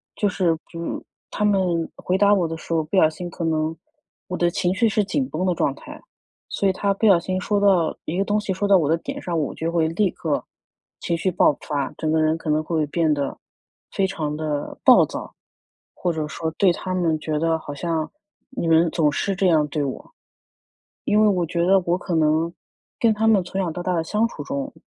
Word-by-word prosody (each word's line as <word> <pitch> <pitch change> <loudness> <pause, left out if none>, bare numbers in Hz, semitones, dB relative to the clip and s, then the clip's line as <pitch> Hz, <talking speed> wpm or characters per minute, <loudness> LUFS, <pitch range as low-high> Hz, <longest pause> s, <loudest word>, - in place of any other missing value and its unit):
就 210 - +1
是， 175 -4 +1
就 170 0 -5 0.3
他 210 - -1
们 180 -5 +1
回 185 - -1
答 200 +1 +5
我 180 -5 +2
的 165 - -5
时 165 - -6
候 160 -1 +2
不 160 +6 -2
小 155 -3 +6
心 175 +2 -7
可 170 - -6
能 160 0 0 0.5
我 180 - -4
的 175 - +2
情 175 +1 0
绪 225 +4 +3
是 210 0 +1
紧 260 +6 -1
绷 180 +4 -2
的 180 - +2
状 140 - 0
态， - - -11 0.5
所 200 - 0
以 190 - +2
他 200 +1 0
不 210 - -1
小 190 -4 +6
心 185 +2 -2
说 205 +2 0
到 190 -5 +3
一 170 - -3
个 195 - +1
东 210 +1 +1
西 205 -2 -2
说 200 +2 -1
到 195 -1 +6
我 150 -4 +1
的 165 - +3
点 - - -6
上， 170 -2 -2
我 150 - -2
就 165 +1 -2
会 165 -2 +2
立 185 +4 +1
刻 155 -3 -2 0.6
情 170 - -1
绪 185 - 0
爆 170 - +4
发， 140 -3 -3
整 155 -1 -1
个 160 - +2
人 155 +1 +2
可 165 - -6
能 150 +1 +2
会 155 -1 0
变 160 0 +1
得 140 -2 -3 0.5
非 195 - +1
常 155 -6 -3
地 150 -2 -3
暴 - - +7
躁， - - -7 0.6
或 175 - -1
者 155 -2 -3
说 160 +1 -4
对 185 +1 +3
他 185 +2 -4
们 165 -4 +1
觉 155 0 -3
得 165 0 +1
好 145 -2 -8
像 160 0 -2 0.5
“你 170 - -1
们 165 +1 +5
总 155 -4 +2
是 195 +6 -1
这 190 0 +2
样 155 -3 +3
对 150 +1 -2
我”。 135 -2 -6 0.9
因 210 +1 +3
为 215 - +5
我 180 -4 +1
觉 170 +1 -1
得 190 +1 +4
我 175 +1 +1
可 180 -1 -3
能 160 +1 +2 0.5
跟 230 -2 +4
他 220 +1 0
们 215 -3 +5
从 195 +2 -3
小 175 -3 -2
到 175 - -5
大 180 +1 -1
的 165 - 0
相 215 +7 +1
处 - - -8
中， 275 0 -4
170 Hz, 250 characters per minute, -22 LUFS, 160-195 Hz, 0.9 s, 暴